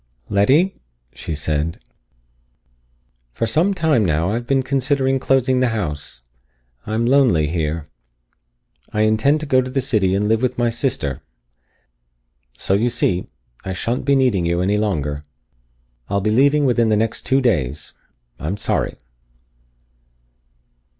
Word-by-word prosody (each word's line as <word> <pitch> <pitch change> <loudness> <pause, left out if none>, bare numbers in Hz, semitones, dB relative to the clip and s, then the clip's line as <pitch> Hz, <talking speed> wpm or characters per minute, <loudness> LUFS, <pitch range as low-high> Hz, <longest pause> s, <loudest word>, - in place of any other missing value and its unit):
"Letty," 135 - +2 0.3
she 80 +5 -5
said, 75 +2 -2 1.5
"for 115 - -2
some 170 - +1
time 155 - +2
now 85 +1 +1
I - - -1
have 120 +1 -3
been 135 -1 +2
considering 135 0 0
closing 130 -1 +2
the 130 - +2
house. 75 - -5 0.7
I'm 110 +2 0
lonely 120 - +3
here. 80 -1 -2 1.1
I 105 - 0
intend 110 +8 +2
to - - -4
go 130 -3 +3
to 130 - -5
the 135 +1 -1
city 110 -8 +1
and 105 +1 0
live 110 +1 +2
with 130 - -1
my 120 -1 +1
sister. 115 - -2 1.4
So, - - -1
you 110 +5 +2
see, 95 -7 0 0.4
I 95 -1 -4
shan't 115 +7 -2
be 140 +1 +3
needing 125 -9 +2
you 85 0 0
any 100 +3 +1
longer. 75 -9 -2 0.9
I'll 100 - +1
be 105 +2 0
leaving 140 +5 +3
within 120 -3 +2
the 105 - +3
next 110 +1 -2
two 135 - +3
days. 75 - -1 0.5
I'm 85 +7 -3
sorry." 105 - -1
110 Hz, 140 wpm, -20 LUFS, 90-130 Hz, 1.5 s, lonely